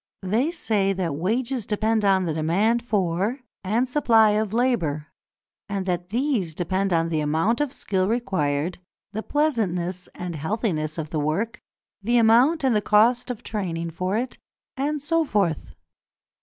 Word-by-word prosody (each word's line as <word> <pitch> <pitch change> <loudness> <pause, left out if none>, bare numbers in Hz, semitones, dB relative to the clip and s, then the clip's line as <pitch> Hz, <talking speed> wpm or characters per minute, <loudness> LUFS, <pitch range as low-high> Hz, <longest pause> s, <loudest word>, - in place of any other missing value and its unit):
They 220 - +1
say 210 - 0
that 180 -5 -2
wages 230 - -1
depend 215 +1 +1
on 190 -2 +3
the 160 - -1
demand 190 +10 +1
for, 205 +3 0 0.2
and 225 +7 +1
supply 230 -5 +4
of, 210 -1 0
labour, 210 - 0 0.6
and 195 -2 -2
that 180 -1 -2
these 230 - 0
depend 190 +3 -1
on 165 -1 +2
the 160 -2 0
amount 160 - +1
of 295 -3 0
skill 190 -8 -1
required, 180 -9 -1 0.3
the 215 - -2
pleasantness 190 - -1
and 180 -2 -5
healthiness 160 - -2
of 155 -2 -5
the 155 - -1
work, 195 +10 -1 0.4
the 240 +4 +2
amount 245 +8 +4
and 260 -4 +3
the 210 - +2
cost 225 +5 +3
of 245 -4 -5
training 170 -6 -3
for 185 +5 -1
it, 250 +2 -4 0.4
and 285 +1 -2
so 330 +2 +2
forth. 200 - -1
205 Hz, 155 wpm, -24 LUFS, 175-235 Hz, 0.6 s, supply